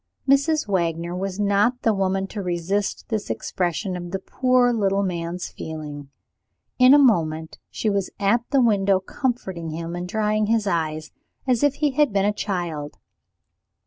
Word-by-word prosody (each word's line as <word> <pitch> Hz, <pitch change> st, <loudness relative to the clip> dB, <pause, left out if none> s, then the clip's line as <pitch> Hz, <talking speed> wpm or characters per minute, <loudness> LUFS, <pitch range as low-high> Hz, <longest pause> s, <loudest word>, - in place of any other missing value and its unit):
Mrs. 280 Hz, +1 st, +3 dB
Wagner 170 Hz, -2 st, -1 dB
was 190 Hz, +1 st, -4 dB
not 205 Hz, +5 st, +2 dB
the 225 Hz, -, +3 dB
woman 195 Hz, -1 st, 0 dB
to 210 Hz, -, -5 dB
resist 180 Hz, +3 st, -2 dB
this 215 Hz, -3 st, -2 dB
expression 180 Hz, +1 st, -2 dB
of 175 Hz, -1 st, -6 dB
the 195 Hz, -, -2 dB
poor 250 Hz, +4 st, +2 dB
little 200 Hz, -3 st, +1 dB
man's 175 Hz, -1 st, -3 dB
feeling. 150 Hz, -3 st, -7 dB, 0.7 s
In 255 Hz, +2 st, +8 dB
a -, -, +8 dB
moment 160 Hz, -, +2 dB
she -, -, -3 dB
was 200 Hz, -2 st, 0 dB
at 205 Hz, +4 st, +3 dB
the 275 Hz, -3 st, +3 dB
window 200 Hz, -4 st, +3 dB
comforting 190 Hz, -, -3 dB
him 165 Hz, +2 st, -5 dB
and 175 Hz, 0 st, -4 dB
drying 215 Hz, +1 st, +1 dB
his 225 Hz, -1 st, +2 dB
eyes, 155 Hz, -4 st, -2 dB, 0.3 s
as 250 Hz, -3 st, +2 dB
if 290 Hz, -1 st, +3 dB
he 295 Hz, 0 st, +1 dB
had 290 Hz, -1 st, +2 dB
been 195 Hz, -1 st, +1 dB
a 210 Hz, -, +2 dB
child. 175 Hz, -8 st, -4 dB
195 Hz, 160 wpm, -23 LUFS, 175-225 Hz, 0.7 s, In